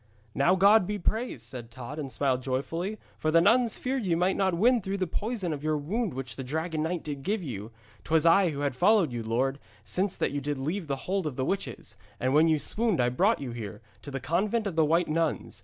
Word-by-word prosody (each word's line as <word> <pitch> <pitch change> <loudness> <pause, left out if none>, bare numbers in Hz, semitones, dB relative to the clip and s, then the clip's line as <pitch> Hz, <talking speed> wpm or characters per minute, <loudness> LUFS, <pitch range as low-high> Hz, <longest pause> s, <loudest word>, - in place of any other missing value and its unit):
'Now 170 +7 +3
God 200 +1 +5
be 210 - -2
praised,' 215 - -2
said 120 -1 -8
Tod, 125 +4 -8
and 140 -3 -5
smiled 130 -2 0
joyfully. 165 - -2 0.2
'For 155 - 0
the 165 +1 +5
nuns 230 +6 +4
feared 260 +1 -2
ye 180 -6 +1
might 180 +3 +2
not 190 -3 +1
win 235 +6 +4
through 195 +1 -3
the 190 - 0
poison 200 -1 -2
of 145 -1 -6
your 155 0 +1
wound 190 - -2
which 130 -4 -6
the 135 - -4
dragon 160 +4 -2
knight 165 +2 -2
did 145 -2 -5
give 200 +6 -1
you. 110 -7 -6 0.3
'Twas 160 0 +2
I 180 +2 +5
who 145 -2 -4
had 140 -3 -1
followed 190 - +4
you, 120 - -3
lord, 130 +5 0 0.2
since 180 - -1
that - - 0
you 145 0 -2
did 145 +1 -2
leave 160 +6 -3
the 140 - -1
hold 190 -3 -1
of 140 - -4
the 130 - -1
witches, 185 - -4 0.2
and 130 +1 0
when 155 +3 +5
you 160 -1 +3
swooned 215 - 0
I 120 0 +3
brought 190 - +2
you 130 -3 -4
here, 115 -4 -6 0.2
to - - -9
the 135 -1 -4
convent 200 - 0
of 195 -5 -3
the 160 -1 +4
White 165 +3 +2
Nuns. 160 0 -1
160 Hz, 240 wpm, -28 LUFS, 135-195 Hz, 0.3 s, God